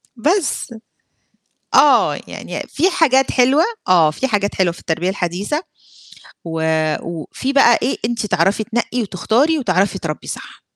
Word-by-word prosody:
بس 295 - -1 1.0
آه، - - +5
يعني - - -6
في 350 +6 +1
حاجات 270 -7 +3
حلوة 265 +5 +3 0.2
آه، 165 -4 +4
في 265 - -2
حاجات 205 -3 -1
حلوة 180 -3 +2
في - - -14
التربية 165 +3 -2
الحديثة 195 - -2 0.8
وفي 160 - -2
بقى 240 -4 +5
إيه، 255 - -1
أنتِ 230 -2 -2
تعرفي 205 +1 +1
تنقي 240 +1 -2
وتختاري 230 - +1
وتعرفي 190 -3 0
تربّي 155 -2 -5
صح. - - -8
215 Hz, 130 wpm, -18 LUFS, 175-265 Hz, 1.0 s, آه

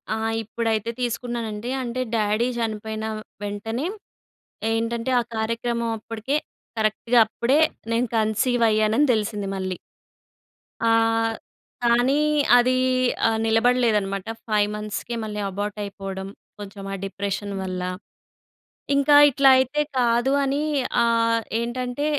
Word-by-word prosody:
ఆ! - - -3 0.3
ఇప్పుడైతే 225 0 -1
తీసుకున్నానండి. 235 -2 -3
అంటే, 245 +1 -3
డ్యాడీ 215 +2 +1
చనిపోయిన 220 -1 -3 0.4
వెంటనే 225 +7 -3 0.8
ఏంటంటే 230 +2 -1
ఆ - - +2 0.2
కార్యక్రమం 230 +1 -1
అప్పడికే 225 +5 -4 0.4
కరెక్ట్‌గా 220 +2 +2
అప్పుడే 240 +6 +1 0.3
నేను 240 +2 +1
కన్సీవ్ 225 +3 +1
అయ్యానని 215 +6 +3
తెలిసింది 210 -2 -2
మళ్ళీ. 185 -1 -3 1.1
ఆ! - - +3 1.0
కానీ, 240 +4 +3 0.4
అది 245 +1 +4 0.6
ఆహ్, 225 0 +1
నిలబడలేదనమాట. 225 -4 +2 0.2
5 210 -1 +2
మంత్స్‌కే 210 +3 -4
మళ్ళీ 210 -1 -4
అబార్ట్ 205 +2 -4
అయిపోవడం, 195 -1 -6 0.3
కొంచెం 200 -1 -8
ఆ - - -2
డిప్రెషన్ 200 +1 -4
వల్ల. 185 -1 -4 1.1
ఇంకా 280 +1 +4
ఇట్లా 275 0 +4
అయితే 260 +3 +1 0.2
కాదు 240 +1 +2
అని 275 +2 0 0.4
ఆహ్, 230 0 +2 0.2
ఏంటంటే, 245 +3 -3
225 Hz, 105 wpm, -23 LUFS, 210-240 Hz, 1.1 s, అది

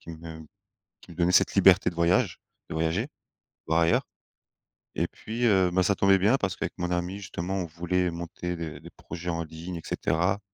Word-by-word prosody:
qui 85 - -10
me 80 0 -9 0.6
qui - - -14
me - - -12
donnait 90 0 +3
cette - - +4
liberté 95 -1 +6
de 85 - -12
voyage 85 - +2 0.3
de - - -5
voyager. 80 +9 0 0.6
Voir 80 +1 +3
ailleurs. 85 0 +2 0.9
Et - - 0
puis, 115 +3 -6
heu, 95 -5 +4
ben 95 +1 +2
ça 100 - +3
tombait 95 0 +5
bien 105 +8 +3
parce 95 -7 -2
qu'avec - - -4
mon 90 0 -2
ami 90 +2 -1
justement, 95 -1 -4
on 95 -2 -1
voulait 90 +2 -1
monter 85 +1 -5
des 80 -4 -6
des - - -12
projets 85 +2 -7
en 85 -1 -1
ligne 80 +3 -7
et 80 - -7
cetera 90 +5 0
90 Hz, 200 wpm, -27 LUFS, 85-95 Hz, 0.9 s, liberté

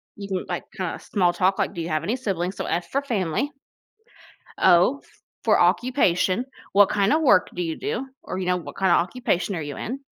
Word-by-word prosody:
You 200 -1 -7
can, 190 -2 -3
like, 175 - -3
kinda 185 -3 -3
small 180 -3 +1
talk, 185 +2 +2
like, - - 0
"Do 170 - -4
you 165 - -4
have 155 0 -1
any 220 +8 -1
siblings?" 190 -6 -2
So, - - -3
F 170 0 -2
for 275 - 0
family. 235 - -1 1.1
O 180 +11 +4 0.4
for - - +4
occupation, 240 -4 +2 0.3
"What 200 0 +7
kind 200 0 +2
of 315 +2 +3
work 255 -11 +4
do 175 - -1
you 160 -1 -3
do?" 265 +3 -3
Or, 185 - -6
you 185 - -3
know, 180 0 +1
"What 170 - -9
kind 190 -2 +2
of - - +5
occupation 200 -1 -1
are 160 - -3
you 145 -2 -6
in?" 265 +5 -5
190 Hz, 215 wpm, -24 LUFS, 175-240 Hz, 1.1 s, What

